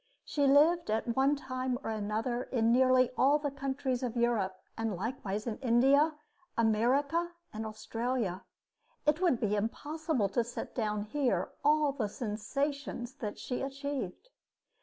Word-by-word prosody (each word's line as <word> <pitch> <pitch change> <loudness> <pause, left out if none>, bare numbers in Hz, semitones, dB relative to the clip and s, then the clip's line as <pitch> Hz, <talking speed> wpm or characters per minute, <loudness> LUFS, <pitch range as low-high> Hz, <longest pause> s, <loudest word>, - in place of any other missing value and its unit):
She 285 -2 +1
lived 310 +4 +5
at 225 +2 0
one 275 +2 +4
time 255 -2 -2
or - - -2
another 220 +4 -2
in 230 -2 +2
nearly 255 0 +5
all 280 +3 +5
the 290 -1 -3
countries 270 -2 -2
of 245 -2 -3
Europe, 220 -6 +1 0.2
and 225 -3 -2
likewise 210 0 -3
in 230 -3 -3
India, 270 +5 +4 0.4
America, 275 +10 +2 0.2
and 220 +1 -4
Australia. 220 -2 -2 0.6
It 305 +3 +2
would 335 -10 +3
be 210 -2 +1
impossible 285 +2 -1
to 235 +5 +1
set 235 - -6
down 210 -3 -1
here 260 +4 0
all 300 0 +4
the 240 -7 -2
sensations 245 +4 -3
that 210 -5 -4
she 250 - -4
achieved. 275 - -4
250 Hz, 140 wpm, -31 LUFS, 220-280 Hz, 0.6 s, lived